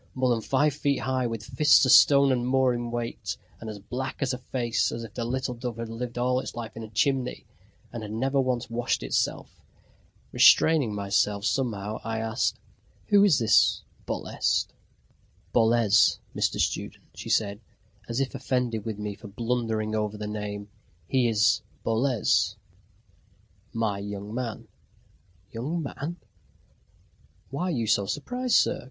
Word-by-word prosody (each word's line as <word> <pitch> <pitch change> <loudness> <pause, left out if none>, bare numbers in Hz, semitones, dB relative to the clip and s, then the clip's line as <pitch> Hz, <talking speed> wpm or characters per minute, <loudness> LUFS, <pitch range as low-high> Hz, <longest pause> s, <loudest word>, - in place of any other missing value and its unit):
more 130 -1 +1
than 115 -2 +1
five 145 +5 +2
feet 140 -1 0
high, 130 -1 0
with 115 -2 -5
fists 130 +5 +4
a - - +1
stone 140 +1 +7
and 125 -1 0
more 130 -1 +3
in 120 0 -3
weight, 120 0 -4 0.2
and 115 - -7
as 105 - -6
black 125 +6 -5
a 130 -1 -1
face 120 -2 -1
as 115 - -5
if 110 -2 -10
the 120 - -3
little 130 +2 -2
dove 120 -1 -5
had 115 -1 -5
lived 120 +1 -5
all 125 +1 +1
its - - -6
life 115 -2 -6
in 115 - -7
a 110 - -8
chimney, 125 +3 0 0.5
and 120 - -5
had 105 -1 -7
never 135 +5 +1
once 125 -2 -1
washed 120 +1 -1
itself! - - -2 0.7
Restraining 145 -10 +5
myself 100 0 0
somehow, 110 -5 -1
I 110 0 -3
asked: 110 +1 -1 0.5
"Who 205 -1 +6
is 195 -8 +5
this 110 -2 +4 0.2
Bolest?" - - -1 0.8
"Boles, 115 -3 +4 0.2
Mr. - - 0
Student," - - -2
she - - -8
said, 105 0 +1 0.5
as 115 +2 -1
if 135 -1 -1
offended 125 -4 -1
with 110 -2 -4
me 105 -1 -4
for 105 +2 -12
blundering 110 0 -2
over 105 -1 -1
the 105 - -5
name, 105 -1 -5 0.4
"he 125 -3 +2
is 105 -1 +3 0.2
Boles 115 +1 +1 1.2
my 110 -4 -1
young 100 +1 -6
man." 120 -2 -4 0.8
"Young 150 +9 -3
man!" 150 +4 -5 1.4
"Why 140 +7 -2
are - - -1
you 120 -9 -1
so 100 -2 +2
surprised, 245 - -1
sir? - - +3
120 Hz, 155 wpm, -26 LUFS, 110-130 Hz, 1.4 s, stone